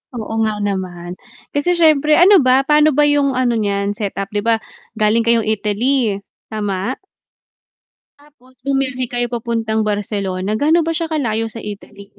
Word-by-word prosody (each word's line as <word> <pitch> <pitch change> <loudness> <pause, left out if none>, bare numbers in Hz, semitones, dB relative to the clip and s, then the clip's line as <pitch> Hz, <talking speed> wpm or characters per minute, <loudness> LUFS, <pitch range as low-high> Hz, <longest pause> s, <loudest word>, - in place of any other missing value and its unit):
Oo 220 -2 -5
nga 215 -1 0
naman, 180 -3 -4 0.3
kasi 320 +5 +1
siyempre 305 -3 +4
ano 375 +3 +7
ba, 260 0 +3
paano 300 0 +3
ba 295 - +4
yung 285 -2 +2
ano 245 -2 +1
niyan 200 -1 -1
set 205 -1 -4
up, 195 0 -4
'di 210 - -1
ba, 230 +2 +2 0.4
galing 215 +1 +2
kayong 230 0 +2
Italy, 215 +1 0 0.2
tama? 205 +2 -3 1.3
Tapos 290 -3 -23
bumiyahe 265 -2 -1
kayo 245 0 0
papuntang 225 -2 -1
Barcelona, 200 -2 -3
gaano 315 +4 +4
ba 330 - 0
siya 335 - -1
kalayo 225 -6 -1
sa 230 - -7
Italy? 200 -1 -9
230 Hz, 155 wpm, -18 LUFS, 205-275 Hz, 1.3 s, ano